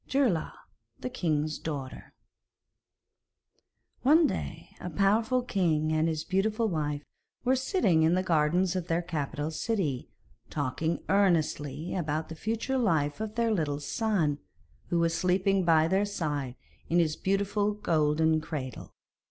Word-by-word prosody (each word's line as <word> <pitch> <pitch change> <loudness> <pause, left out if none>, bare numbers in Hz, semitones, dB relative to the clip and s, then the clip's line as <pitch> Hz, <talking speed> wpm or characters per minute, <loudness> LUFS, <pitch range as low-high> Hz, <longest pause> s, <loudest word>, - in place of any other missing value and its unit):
GEIRLAUG 250 - +1 0.5
THE 255 - -4
KING'S 155 -9 -1
DAUGHTER 140 -5 -6 1.9
One 310 +5 +6
day - - -4
a - - -5
powerful 225 +6 +2
king 160 -9 +1
and 155 +1 +2
his 160 -1 -1
beautiful 215 +4 +1
wife 150 -5 -2 0.4
were 255 +1 +3
sitting 260 - +2
in 160 +2 +4
the 185 - +1
gardens 175 +2 +2
of 180 -2 -2
their 170 +1 0
capital 155 -2 -3
city, 160 - -2 0.4
talking 155 +4 -2
earnestly 165 -5 +1
about 155 -3 -2
the 160 - -6
future 225 +8 -1
life 160 - +1
of 215 -1 -4
their 230 -1 +1
little 150 -8 0
son, 160 -4 0 0.5
who 175 - 0
was 170 0 +2
sleeping 185 +2 +2
by 160 -1 +5
their 190 +4 +2
side 145 -10 -3 0.3
in 170 - +2
his 160 -3 +2
beautiful 200 +2 0
golden 160 -4 +2
cradle. 145 -6 -6
170 Hz, 135 wpm, -29 LUFS, 155-205 Hz, 1.9 s, One